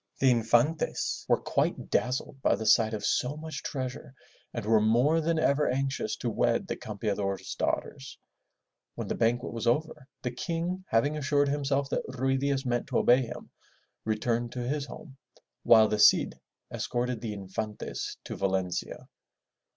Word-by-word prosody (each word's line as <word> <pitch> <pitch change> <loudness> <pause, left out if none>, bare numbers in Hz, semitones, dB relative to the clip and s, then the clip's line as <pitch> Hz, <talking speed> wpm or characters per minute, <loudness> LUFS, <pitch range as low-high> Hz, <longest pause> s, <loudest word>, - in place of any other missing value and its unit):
The 135 -1 +4
Infantes 120 +6 +1
were - - +4
quite - - -1
dazzled 130 +2 -1
by - - +3
the 110 - -5
sight 110 0 +4
of 105 0 -4
so 135 +4 0
much 160 0 -6
treasure 130 0 -5 0.4
and 115 -3 -5
were 110 0 +4
more 125 +9 +3
than 165 +1 0
ever 150 -1 +2
anxious 135 +1 -1
to - - -3
wed - - +1
the - - -3
Campeador's 100 -2 -3
daughters. - - -3 0.8
When - - -5
the - - 0
banquet 120 +2 0
was 115 0 -3
over, 150 +2 0 0.2
the 125 - -1
King 170 +7 -3
having 145 +7 +2
assured 145 -1 +2
himself 140 -1 0
that - - 0
Ruy 130 +1 0
Diaz 140 0 0
meant 120 -1 -1
to - - 0
obey 125 +2 +5
him, 120 - -7 0.5
returned 115 +2 -1
to 125 -1 -4
his 145 +1 -2
home, 135 -2 -11 0.4
while 110 -1 +6
the 105 0 -1
Cid - - +5 0.3
escorted 120 -1 -2
the 110 -3 -4
Infantes 105 +2 -5
to - - -6
Valencia. 95 -2 -2
125 Hz, 160 wpm, -29 LUFS, 110-140 Hz, 0.8 s, while